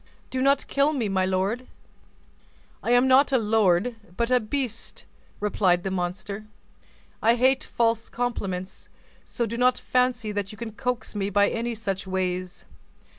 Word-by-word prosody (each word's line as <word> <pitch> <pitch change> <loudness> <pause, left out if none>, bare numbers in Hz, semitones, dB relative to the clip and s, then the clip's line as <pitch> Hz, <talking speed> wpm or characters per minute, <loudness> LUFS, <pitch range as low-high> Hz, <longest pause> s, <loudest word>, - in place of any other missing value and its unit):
Do 255 - -1
not 275 +1 +3
kill 280 +2 +2
me, 240 -8 -1
my 190 -1 +1
lord!" 195 +7 -1 1.1
"I - - -3
am 245 +2 +5
not 265 +2 +5
a 265 - +4
lord, 220 0 +2 0.2
but 235 +1 0
a 250 - +5
beast," 240 0 -4 0.3
replied. 185 -4 +2
the 195 - -2
monster, 190 +3 -4 0.8
"I 230 +2 +4
hate 260 +2 +3
false 230 -1 0
compliments: 195 -6 -4 0.4
so 235 - -2
do 230 +1 -4
not 250 0 +4
fancy 250 -3 0
that 205 -1 -3
you 210 - -11
can 230 0 -6
coax 250 +2 -3
me 200 -1 -1
by 205 0 +3
any 235 0 -2
such 195 -3 -4
ways. 185 -1 -3
225 Hz, 155 wpm, -25 LUFS, 195-250 Hz, 1.1 s, am